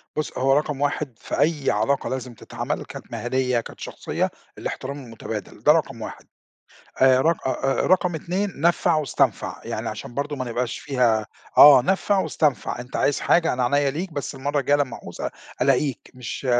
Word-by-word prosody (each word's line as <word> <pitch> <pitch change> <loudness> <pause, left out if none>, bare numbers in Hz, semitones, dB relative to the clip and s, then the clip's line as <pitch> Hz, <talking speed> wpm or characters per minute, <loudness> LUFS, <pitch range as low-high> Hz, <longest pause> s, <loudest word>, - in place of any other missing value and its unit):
بُص 155 - -3
هو 135 +1 +3
رقم 145 -1 0
1 145 -4 -2
في - - -4
أي 150 -3 +2
علاقة 110 +7 0
لازم 130 -1 -4
تتعمل، 115 - -5
كانت - - -10
مهنيَّة، 125 0 0
كانت 115 - -10
شخصية - - -2 0.3
الاحترام 140 +1 -5
المتبادل، 115 -3 -7
ده - - +7
رقم - - 0
1، - - -8 0.8
آآ 130 -1 +6
رق 160 -1 +1
آآ، 130 - +1 0.3
آآ - - 0
رقم 180 -1 +3
2 180 0 -3
نَفع 170 0 +3
واستنفَع، 155 -2 0
يعني - - -3
عشان 120 - -7
برضه 145 +2 -2
ما 130 - -3
نبقاش 120 0 -2
فيها 120 -6 +1 0.3
آه، 140 -3 +10
نَفع 190 +5 +1
واستنفَع، 150 -9 0
أنت 125 +1 -6
عايز 145 - +1
حاجة 170 -1 +3
أنا 125 0 0
عينيّا 140 +2 +2
ليك، 170 +5 -4
بس 145 -1 -4
المرّة 140 +2 -1
الجاية 145 +1 +3
لمّا 135 -5 -1
أعُوز - - -10
ال - - -2 0.3
ألاقيك، 135 0 +1
مش 125 +2 -6
140 Hz, 175 wpm, -23 LUFS, 125-150 Hz, 0.8 s, آه